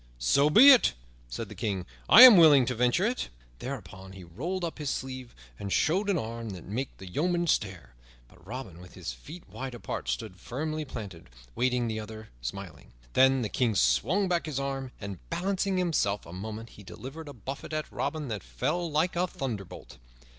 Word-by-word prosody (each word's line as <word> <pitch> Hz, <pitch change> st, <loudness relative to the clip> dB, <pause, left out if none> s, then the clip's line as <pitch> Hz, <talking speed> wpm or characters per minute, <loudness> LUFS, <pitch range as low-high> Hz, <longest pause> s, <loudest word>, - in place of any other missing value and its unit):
"So 100 Hz, -, +3 dB
be 250 Hz, -, +9 dB
it," 255 Hz, -, +5 dB, 0.3 s
said -, -, -5 dB
the -, -, -10 dB
King, 95 Hz, -4 st, -3 dB, 0.2 s
"I 240 Hz, -, +11 dB
am 250 Hz, -4 st, +12 dB
willing 150 Hz, -7 st, +7 dB
to 125 Hz, -, -1 dB
venture 125 Hz, -, +2 dB
it." 245 Hz, +3 st, -2 dB, 0.3 s
Thereupon 95 Hz, -7 st, -8 dB
he 95 Hz, -1 st, -11 dB
rolled 165 Hz, -, -4 dB
up 165 Hz, -, -6 dB
his 150 Hz, -2 st, -2 dB
sleeve 130 Hz, -2 st, -5 dB, 0.2 s
and 100 Hz, -, -5 dB
showed 190 Hz, -, +1 dB
an 195 Hz, -, +2 dB
arm 115 Hz, -3 st, -5 dB
that 90 Hz, -, -10 dB
made 125 Hz, +7 st, -3 dB
the 95 Hz, -, -10 dB
yeomen 175 Hz, -, 0 dB
stare. 95 Hz, -, -1 dB, 0.3 s
But -, -, -21 dB
Robin, 110 Hz, -6 st, -8 dB
with 90 Hz, -, -14 dB
his -, -, -5 dB
feet 155 Hz, -, -12 dB
wide 130 Hz, -1 st, -7 dB
apart, 110 Hz, -, -5 dB
stood 90 Hz, -, -4 dB
firmly 155 Hz, -, -4 dB
planted, 95 Hz, -, -9 dB, 0.2 s
waiting 125 Hz, -, 0 dB
the 110 Hz, -1 st, -3 dB
other, 110 Hz, 0 st, -9 dB
smiling. 90 Hz, +2 st, -8 dB, 0.2 s
Then 130 Hz, -1 st, +4 dB
the -, -, -1 dB
King 115 Hz, -2 st, 0 dB
swung 100 Hz, -, +2 dB
back 175 Hz, -2 st, 0 dB
his 140 Hz, -3 st, -3 dB
arm, 135 Hz, -1 st, -4 dB
and, 100 Hz, -3 st, -7 dB
balancing 190 Hz, +2 st, -1 dB
himself 155 Hz, -, 0 dB
a 85 Hz, -, -11 dB
moment, 110 Hz, +4 st, -7 dB
he 105 Hz, -, -14 dB
delivered 135 Hz, +11 st, -9 dB
a -, -, -8 dB
buffet 135 Hz, +3 st, -7 dB
at 155 Hz, 0 st, -3 dB
Robin 155 Hz, -3 st, -3 dB
that 105 Hz, -3 st, -4 dB
fell 165 Hz, -, -2 dB
like 160 Hz, +4 st, 0 dB
a 180 Hz, +1 st, +1 dB
thunderbolt. 105 Hz, -, -7 dB
125 Hz, 190 wpm, -28 LUFS, 100-160 Hz, 0.3 s, am